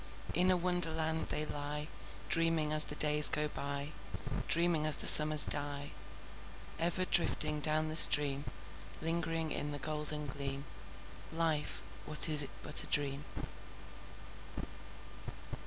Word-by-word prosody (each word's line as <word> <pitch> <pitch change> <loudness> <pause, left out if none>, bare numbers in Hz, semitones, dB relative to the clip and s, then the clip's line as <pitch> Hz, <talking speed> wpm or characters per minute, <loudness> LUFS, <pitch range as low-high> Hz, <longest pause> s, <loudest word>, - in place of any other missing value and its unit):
In 180 +3 0
a 185 - -1
Wonderland 160 -3 -5
they 150 - -4
lie, 150 0 -9 0.4
Dreaming 165 -2 -3
as 155 0 +4
the 150 - -8
days 150 0 +7
go 150 0 -5
by, 140 0 -9 0.6
Dreaming 165 -2 -2
as 155 - +4
the - - -7
summers 150 0 +10
die: 145 0 -7 0.9
Ever 175 +2 -4
drifting 150 -4 -2
down 155 +1 -3
the 155 - -8
stream— 145 -3 +2 0.5
Lingering 165 -1 -6
in 150 - -7
the 145 - -8
golden 150 +1 -5
gleam— 140 0 -8 0.7
Life, 160 -2 -6 0.2
what 150 +2 0
is 155 -1 +3
it 140 - -5
but 150 - +2
a - - -11
dream? 145 0 -4
150 Hz, 125 wpm, -29 LUFS, 145-160 Hz, 0.9 s, summers